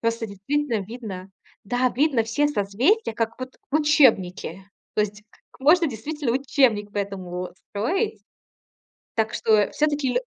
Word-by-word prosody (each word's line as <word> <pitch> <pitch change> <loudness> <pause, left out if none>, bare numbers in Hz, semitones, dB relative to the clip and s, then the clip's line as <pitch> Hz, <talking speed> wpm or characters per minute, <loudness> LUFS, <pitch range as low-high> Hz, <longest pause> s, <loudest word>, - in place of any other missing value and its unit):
Просто 230 0 -1
действительно 230 +4 -1
видно, 200 -4 -8 0.3
да, 245 +4 +1
видно 265 -4 +2
все 290 +6 +1
созвездия, 250 - +1
как 230 +1 -2
вот 255 0 -7
в 300 - +3
учебнике. 195 - +3 0.3
То - - +2
есть 210 0 -5 0.3
как - - -22
можно 330 +5 +5
действительно 275 +2 -3
учебник 250 -6 +2
по 205 - -3
этому 185 -3 -4 0.2
строить. 350 - -1 0.9
Так 220 -1 0
что, 220 - -1
э, 205 -1 +2
всё-таки 295 -3 +1
лё - - +1
230 Hz, 145 wpm, -24 LUFS, 205-290 Hz, 0.9 s, можно